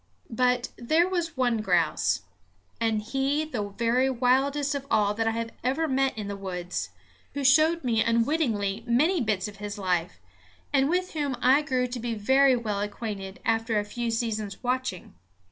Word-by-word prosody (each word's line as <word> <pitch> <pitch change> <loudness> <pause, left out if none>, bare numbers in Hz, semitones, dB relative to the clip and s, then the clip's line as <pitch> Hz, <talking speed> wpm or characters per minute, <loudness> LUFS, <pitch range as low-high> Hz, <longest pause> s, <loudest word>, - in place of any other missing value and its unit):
But 250 +1 +1
there 315 +9 +2
was 340 -4 -2
one 245 -3 +2
grouse 175 -6 +1 0.6
and 220 -2 0
he 270 +6 0
the 220 -9 -4
very 235 +5 +1
wildest 270 +3 +1
of 275 -1 -5
all 205 -1 +2
that 225 +1 -1
I - - +3
have 230 0 -3
ever 275 +6 0
met 270 -3 +1
in 210 -2 -4
the 200 - -4
woods 180 -2 -4 0.5
who 285 - -2
showed 310 +5 +4
me 230 -3 +2
unwittingly 230 -4 0
many 300 +9 +3
bits 215 -4 0
of 205 -1 -10
his 205 +1 -6
life, 180 - -1 0.6
and 275 0 +3
with 365 +2 -1
whom 285 -5 -2
I 260 +4 +5
grew 255 -4 0
to 245 0 -5
be 235 0 -3
very 265 +5 +4
well 215 -4 -2
acquainted 205 -2 -5
after 225 0 +1
a 205 - 0
few 235 +3 -3
seasons' 220 -3 -3
watching. 250 -7 -2
235 Hz, 170 wpm, -27 LUFS, 210-270 Hz, 0.6 s, I